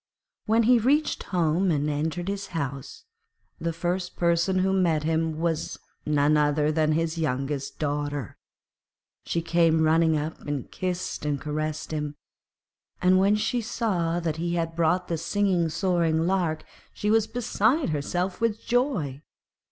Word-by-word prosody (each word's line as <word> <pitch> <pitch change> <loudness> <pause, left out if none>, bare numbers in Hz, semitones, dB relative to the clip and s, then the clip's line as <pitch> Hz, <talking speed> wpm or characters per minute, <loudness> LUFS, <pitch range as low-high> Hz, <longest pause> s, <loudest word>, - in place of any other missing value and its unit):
When 225 +2 +4
he 240 +1 +5
reached 285 +7 +1
home, 175 +1 +1
and 150 -3 +1
entered 160 +4 -2
his 200 0 -3
house, 140 -2 -5 0.5
the 170 0 -1
first 180 +2 -3
person 170 +2 +2
who 190 +1 +2
met 170 -5 +2
him 160 0 0
was 165 -2 -1 0.3
none 150 0 +3
other 150 0 +2
than 155 0 +2
his 165 +1 -1
youngest 140 -1 -2
daughter; 145 - -3 0.9
she 170 - -1
came 165 -1 +3
running 160 0 +3
up 155 +2 -4
and 145 -3 -4
kissed 180 -4 -3
and 145 -1 -1
caressed 155 +1 -3
him, 150 -1 -3 0.8
and 185 +1 +4
when 200 +2 +4
she 225 +3 0
saw 190 -8 -1
that 165 -2 -2
he 170 +1 -1
had 165 -1 -2
brought 175 +2 +1
the 165 -2 -2
singing, 180 -1 +1
soaring 165 -2 +1
lark, 175 -4 0 0.3
she 210 0 0
was 220 -1 +3
beside 240 - +1
herself 175 +7 -2
with 225 -2 +1
joy. 230 - -1
165 Hz, 145 wpm, -26 LUFS, 155-190 Hz, 0.9 s, he